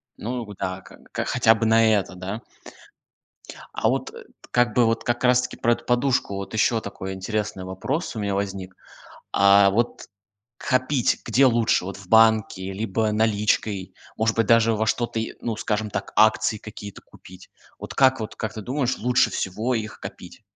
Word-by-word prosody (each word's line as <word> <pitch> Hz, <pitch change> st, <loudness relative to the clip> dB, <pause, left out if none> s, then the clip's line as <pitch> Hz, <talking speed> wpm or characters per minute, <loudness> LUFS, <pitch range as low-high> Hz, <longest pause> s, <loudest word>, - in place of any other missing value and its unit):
Ну, 120 Hz, +2 st, -4 dB
вот 105 Hz, -2 st, -11 dB
да, 95 Hz, 0 st, -4 dB
как 95 Hz, -, -16 dB
бы, -, -, -22 dB
как, -, -, -3 dB
хотя 110 Hz, -, +4 dB
бы 115 Hz, 0 st, -2 dB
на 115 Hz, 0 st, +4 dB
это, 100 Hz, -3 st, -1 dB
да? 95 Hz, +5 st, -6 dB, 1.3 s
А -, -, 0 dB
вот, -, -, -2 dB
э, -, -, -11 dB
т -, -, -22 dB
как 120 Hz, 0 st, +2 dB
бы 120 Hz, -, +4 dB
вот 115 Hz, 0 st, 0 dB
как 120 Hz, +1 st, -1 dB
раз-таки 125 Hz, 0 st, +2 dB
про 120 Hz, -, +2 dB
эту 120 Hz, 0 st, -8 dB
подушку 125 Hz, -4 st, +1 dB
вот 100 Hz, +2 st, -6 dB
ещё 115 Hz, +1 st, +2 dB
такой 95 Hz, -2 st, -6 dB
интересный 100 Hz, 0 st, -3 dB
вопрос 120 Hz, -, -3 dB
у -, -, -4 dB
меня 100 Hz, -1 st, -1 dB
возник. 95 Hz, -2 st, -4 dB, 0.6 s
А 100 Hz, 0 st, +6 dB
вот 115 Hz, +4 st, -2 dB, 0.5 s
копить 130 Hz, 0 st, 0 dB
где 125 Hz, +4 st, +4 dB
лучше: 115 Hz, -6 st, +2 dB
вот 100 Hz, -, -6 dB
в 100 Hz, -2 st, -14 dB
банке 110 Hz, -4 st, +3 dB
либо 110 Hz, +2 st, -1 dB
наличкой, 105 Hz, -3 st, 0 dB, 0.2 s
может 110 Hz, 0 st, 0 dB
быть, 115 Hz, -2 st, +2 dB
даже 115 Hz, 0 st, +4 dB
во 110 Hz, +1 st, -1 dB
что-то 115 Hz, +1 st, -1 dB
и 115 Hz, -, -5 dB
ну, 115 Hz, -2 st, -3 dB
скажем 105 Hz, 0 st, -2 dB
так, 100 Hz, -, -5 dB
акции 110 Hz, 0 st, +3 dB
какие-то 105 Hz, -1 st, -10 dB
купить? 95 Hz, 0 st, -16 dB, 0.3 s
Вот -, -, -8 dB
как, 130 Hz, -2 st, +4 dB
вот 110 Hz, -, -6 dB
как 110 Hz, -1 st, -4 dB
ты 110 Hz, -, -6 dB
думаешь, 130 Hz, +2 st, -1 dB
лучше 125 Hz, +2 st, +2 dB
всего 110 Hz, +7 st, -2 dB
их 110 Hz, -2 st, -5 dB
копить? -, -, -10 dB
110 Hz, 185 wpm, -23 LUFS, 100-120 Hz, 1.3 s, А